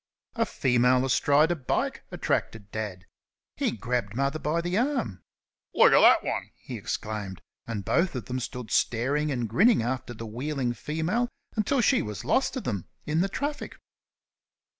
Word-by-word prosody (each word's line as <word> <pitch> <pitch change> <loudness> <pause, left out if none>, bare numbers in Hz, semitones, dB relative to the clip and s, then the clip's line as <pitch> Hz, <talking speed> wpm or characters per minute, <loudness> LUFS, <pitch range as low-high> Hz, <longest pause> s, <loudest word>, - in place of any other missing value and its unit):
A - - 0
female 125 0 +3
astride 145 +4 +3
a - - +2
bike 135 -6 -1
attracted 105 -2 -2
Dad; 100 -4 -5 0.5
he - - 0
grabbed 115 -1 -2
Mother 140 +4 0
by 155 +3 0
the 175 +2 -2
arm. 225 - 0 0.5
"Look - - +7
at - - +7 0.2
thet - - -6
'un!" - - -2
he - - -8
exclaimed; 105 -3 -4 0.3
and 105 -4 -4
both 170 -3 +1
of 125 - -4
them 130 0 -3
stood 125 -2 -6
staring 140 +6 +1
and 120 -4 -1
grinning 200 - +4
after 120 0 -3
the 115 - -7
wheeling 125 +2 -2
female 160 - -1 0.3
until 240 +5 +2
she - - +4
was 105 -1 -6
lost 270 - +1
to 260 - -2
them 100 - -3 0.2
in 155 +2 +1
the 195 - +1
traffic. 290 +7 -4
130 Hz, 160 wpm, -27 LUFS, 115-170 Hz, 0.5 s, Look